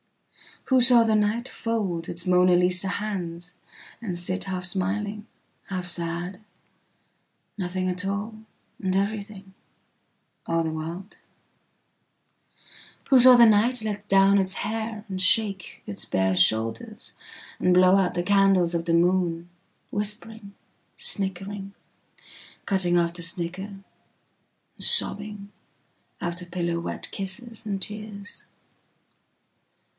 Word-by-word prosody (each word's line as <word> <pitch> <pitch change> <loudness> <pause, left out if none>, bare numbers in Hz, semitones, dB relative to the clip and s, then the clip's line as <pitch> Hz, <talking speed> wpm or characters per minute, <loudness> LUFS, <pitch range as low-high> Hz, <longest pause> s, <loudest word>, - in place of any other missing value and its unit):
Who 260 -1 +3
saw 240 -1 +7
the 220 -1 +2
nightfold 210 -4 -1
its 170 0 -5
Mona 180 0 +4
Lisa 180 +1 +2
handsand 180 -4 -4 0.6
sit 185 +2 -3
half 185 -2 -4
smiling, 205 +4 -3 0.4
half 185 -2 -3
sad, 175 +2 -2 1.2
nothing 185 -1 -2
at 180 +2 -3
all, 205 +3 -3 0.4
and 190 -2 -1
everything, 200 -1 -3 0.9
all 165 0 +1
the 160 - -2
world 165 +5 -7 1.9
?Who 265 - +7
saw 250 +1 +9
the 240 -1 +8
nightlet 215 -1 +1
down 195 0 +5
its 190 -1 0
hairand 220 -3 -4
shake 195 -1 +2
its 100 - -5
bare 95 0 +1
shouldersand 110 +4 0 0.6
blow 185 +1 +6
out 190 -2 +1
the 175 - -1
candles 195 -2 +3
of 170 0 -2
the 170 - 0
moon, 175 0 +1 0.4
whispering, 210 0 -5 0.4
snickering, 195 0 -2 0.9
cutting 185 -3 +2
off 170 -1 +1
the 175 - -8
snicker.. 170 +2 -3
and 195 -1 -13 1.0
sobbing 205 -1 +1 0.7
..out 175 +1 -3
of 175 - -10
pillow 170 -1 -2
wet 170 - -6
kisses 215 +4 -6
and 195 -2 -3
tears? 210 0 -6
195 Hz, 110 wpm, -25 LUFS, 175-210 Hz, 1.9 s, saw